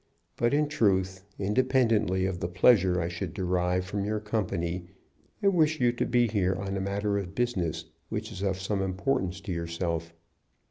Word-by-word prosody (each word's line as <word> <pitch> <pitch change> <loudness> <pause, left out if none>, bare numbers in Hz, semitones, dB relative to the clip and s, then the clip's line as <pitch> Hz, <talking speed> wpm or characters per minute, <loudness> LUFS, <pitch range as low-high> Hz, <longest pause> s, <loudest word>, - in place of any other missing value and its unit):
But 120 +4 +2
in 150 0 +2
truth, 95 -9 +1
independently 110 -3 +2
of 95 -2 -2
the 85 - -2
pleasure 90 0 +4
I 85 - -1
should 85 0 -5
derive 90 -1 0
from 100 +1 -3
your 105 +1 -1
company, 90 -5 -2 0.6
I - - +4
wish 160 -4 +2
you 120 -2 +4
to 120 - -2
be 120 0 +3
here 95 -4 +1
on 95 +1 -3
a 95 - -1
matter 100 +1 0
of 95 -1 -7
business 105 -10 -1 0.2
which - - -4
is - - -7
of 95 -1 0
some 95 +1 -1
importance 95 0 -1
to 95 - -6
yourself. 85 -1 -3
95 Hz, 175 wpm, -28 LUFS, 90-115 Hz, 0.6 s, pleasure